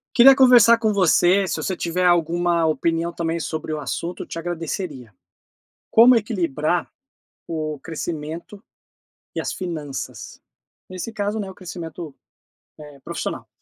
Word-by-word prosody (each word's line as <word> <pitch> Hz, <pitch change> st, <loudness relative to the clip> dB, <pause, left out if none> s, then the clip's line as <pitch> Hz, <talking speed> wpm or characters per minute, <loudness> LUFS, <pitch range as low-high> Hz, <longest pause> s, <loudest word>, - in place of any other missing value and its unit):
Queria 265 Hz, +2 st, +9 dB
conversar 245 Hz, -3 st, +7 dB
com 220 Hz, -2 st, 0 dB
você, 190 Hz, 0 st, +3 dB
se 155 Hz, -, -2 dB
você 165 Hz, +4 st, -2 dB
tiver 175 Hz, +1 st, -1 dB
alguma 170 Hz, -1 st, +2 dB
opinião 165 Hz, +2 st, 0 dB
também 170 Hz, 0 st, -2 dB
sobre 160 Hz, -1 st, -4 dB
o 155 Hz, -, -3 dB
assunto 145 Hz, +7 st, -4 dB
eu -, -, -7 dB
te -, -, -7 dB
agradeceria. 165 Hz, -, -5 dB, 0.8 s
Como 235 Hz, +3 st, +7 dB
equilibrar 175 Hz, -, -1 dB, 0.6 s
o 155 Hz, -3 st, -4 dB
crescimento 165 Hz, +4 st, -6 dB, 0.7 s
e -, -, -1 dB
as -, -, -3 dB
finanças? 155 Hz, -7 st, -6 dB, 0.5 s
Nesse 185 Hz, +4 st, -6 dB
caso, 210 Hz, 0 st, -2 dB
né, 200 Hz, -2 st, -4 dB
o 190 Hz, -, -11 dB
crescimento, 170 Hz, -3 st, -8 dB, 0.7 s
eh, 150 Hz, -2 st, -12 dB
profissional. -, -, -5 dB
170 Hz, 130 wpm, -22 LUFS, 155-195 Hz, 0.8 s, Queria